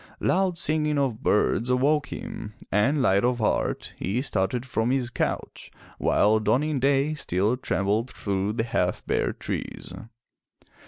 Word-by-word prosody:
Loud 185 Hz, -2 st, +1 dB
singing 150 Hz, -2 st, +1 dB
of 130 Hz, -5 st, 0 dB
birds 115 Hz, +2 st, +2 dB
awoke 145 Hz, +4 st, +2 dB
him, 105 Hz, 0 st, -7 dB, 0.2 s
and, 130 Hz, +8 st, +2 dB
light 100 Hz, -3 st, +3 dB
of 125 Hz, 0 st, +2 dB
heart, 110 Hz, -, -1 dB
he 100 Hz, +6 st, -1 dB
started 120 Hz, +1 st, -1 dB
from 115 Hz, -2 st, -1 dB
his 125 Hz, -2 st, 0 dB
couch, -, -, -3 dB, 0.3 s
while 110 Hz, +2 st, +3 dB
dawning 140 Hz, +6 st, +1 dB
day 140 Hz, +3 st, +2 dB
still 105 Hz, -, 0 dB
trembled 110 Hz, -1 st, -1 dB
through 100 Hz, -3 st, -2 dB
the 115 Hz, -, 0 dB
half 115 Hz, -, -1 dB
bare -, -, 0 dB
trees. -, -, -6 dB
125 Hz, 140 wpm, -26 LUFS, 105-140 Hz, 0.3 s, light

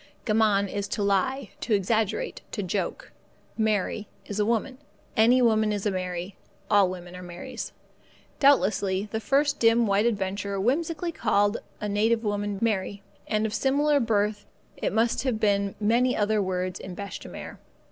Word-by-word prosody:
Gammon 215 Hz, -3 st, +3 dB
is 200 Hz, +1 st, -3 dB
to 205 Hz, -, -2 dB
lie, 200 Hz, +5 st, 0 dB
to 220 Hz, -, +2 dB
exaggerate, 220 Hz, -, 0 dB
to -, -, -2 dB
joke. -, -, -3 dB, 0.4 s
Mary 215 Hz, -1 st, 0 dB, 0.2 s
is 205 Hz, 0 st, -5 dB
a 210 Hz, -, +3 dB
woman. 235 Hz, +3 st, -1 dB, 0.4 s
Any 245 Hz, +3 st, +5 dB
woman 220 Hz, -2 st, +3 dB
is 205 Hz, -1 st, -2 dB
a 205 Hz, -, +2 dB
Mary. 180 Hz, 0 st, -4 dB, 0.4 s
All 200 Hz, -2 st, +5 dB
women 180 Hz, -1 st, -8 dB
are 180 Hz, -, -8 dB
Marys. 175 Hz, 0 st, -7 dB, 0.7 s
Doubtlessly 205 Hz, -7 st, +3 dB
the 220 Hz, -, -1 dB
first 280 Hz, +6 st, +1 dB
dim 230 Hz, 0 st, +4 dB
white 205 Hz, +2 st, +2 dB
adventurer 200 Hz, -2 st, -2 dB
whimsically 320 Hz, -, 0 dB
called 205 Hz, -6 st, +2 dB, 0.2 s
a 210 Hz, -, -3 dB
native 220 Hz, +3 st, +1 dB
woman 205 Hz, -1 st, -1 dB
Mary, 200 Hz, -2 st, -1 dB, 0.2 s
and 215 Hz, 0 st, +1 dB
of 215 Hz, -, -2 dB
similar 285 Hz, +5 st, +2 dB
birth 210 Hz, -3 st, 0 dB, 0.4 s
must 225 Hz, +2 st, +1 dB
have 255 Hz, -5 st, -1 dB
been 200 Hz, -2 st, +1 dB
many 235 Hz, +4 st, +2 dB
other 210 Hz, 0 st, +2 dB
words 185 Hz, -1 st, -2 dB
in 185 Hz, -2 st, -8 dB
bêche 200 Hz, +1 st, -6 dB
de -, -, -10 dB
mer. -, -, -9 dB
210 Hz, 155 wpm, -26 LUFS, 200-230 Hz, 0.7 s, Any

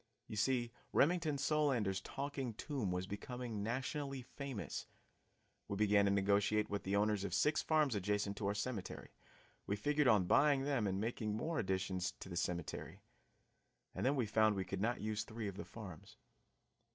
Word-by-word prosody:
You -, -, -6 dB
see 120 Hz, +2 st, +1 dB, 0.2 s
Remington 155 Hz, -2 st, +3 dB
Solander's 135 Hz, -9 st, +1 dB
Talking 135 Hz, -3 st, -4 dB
Tomb 130 Hz, -8 st, -2 dB
was 90 Hz, +1 st, -1 dB
becoming 110 Hz, +2 st, -5 dB
nationally 135 Hz, +4 st, -2 dB
famous. 135 Hz, -3 st, -5 dB, 0.8 s
We 100 Hz, -, -2 dB
began 105 Hz, 0 st, +4 dB
to 100 Hz, -, +3 dB
negotiate 100 Hz, +2 st, +2 dB
with 100 Hz, -1 st, -1 dB
the 95 Hz, +1 st, -1 dB
owners 105 Hz, -1 st, +2 dB
of 95 Hz, -3 st, -1 dB
six 150 Hz, +9 st, +3 dB
farms 155 Hz, -4 st, +3 dB
adjacent 100 Hz, 0 st, 0 dB
to 100 Hz, -, -1 dB
our 100 Hz, -, 0 dB
cemetery; 105 Hz, -1 st, -4 dB, 0.6 s
we 100 Hz, -, +1 dB
figured 145 Hz, +7 st, +2 dB
on 105 Hz, -6 st, +5 dB
buying 140 Hz, +6 st, +4 dB
them 135 Hz, -7 st, +1 dB
and 95 Hz, 0 st, 0 dB
making 110 Hz, -1 st, -1 dB
more 160 Hz, +7 st, -2 dB
new -, -, +2 dB
additions 95 Hz, -2 st, -1 dB
to -, -, -10 dB
the 85 Hz, -, -5 dB
cemetery. 85 Hz, -1 st, -3 dB, 0.9 s
And -, -, -3 dB
then 135 Hz, +3 st, +3 dB
we 125 Hz, -4 st, +1 dB
found 110 Hz, 0 st, +3 dB
we 95 Hz, -1 st, -2 dB
could 95 Hz, -1 st, -3 dB
not 120 Hz, +3 st, 0 dB
use 110 Hz, 0 st, -1 dB
three 110 Hz, -1 st, -5 dB
of 100 Hz, -, -5 dB
the -, -, -6 dB
farms. 95 Hz, -8 st, -10 dB
110 Hz, 175 wpm, -37 LUFS, 100-135 Hz, 0.9 s, on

